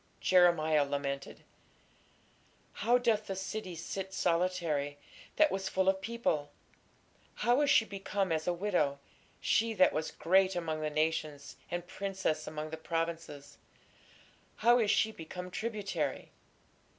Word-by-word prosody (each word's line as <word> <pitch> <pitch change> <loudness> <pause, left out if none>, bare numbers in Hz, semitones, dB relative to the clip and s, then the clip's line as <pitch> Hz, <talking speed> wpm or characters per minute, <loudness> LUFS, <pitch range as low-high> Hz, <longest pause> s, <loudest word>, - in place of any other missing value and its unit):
Jeremiah 170 -5 +4
lamented: 140 -1 -4 1.3
How 240 +4 +3
doth 225 -3 +1
the 195 - -3
city 190 -1 -5
sit 190 +3 -5
solitary, 165 -5 0 0.4
that 310 -1 +4
was 190 0 -2
full 190 0 0
of 190 0 +3
people! 195 -10 -1 0.9
how 245 +4 +2
is 290 - +2
she 230 - +5
become 195 -2 -2
as 160 0 -1
a - - +3
widow! 175 -6 0 0.4
she 225 0 +1
that 185 -2 +5
was 155 +1 -2
great 190 +2 +2
among 160 -3 -2
the 155 - -1
nations, 155 -2 -2
and 175 0 -3
princess 190 -5 -2
among 155 0 -5
the 160 - -5
provinces, 165 -3 -4 1.0
how 240 +1 +4
is 215 -3 +2
she 220 +2 +3
become 180 0 -8
tributary! 195 - -3
180 Hz, 130 wpm, -32 LUFS, 155-195 Hz, 1.3 s, she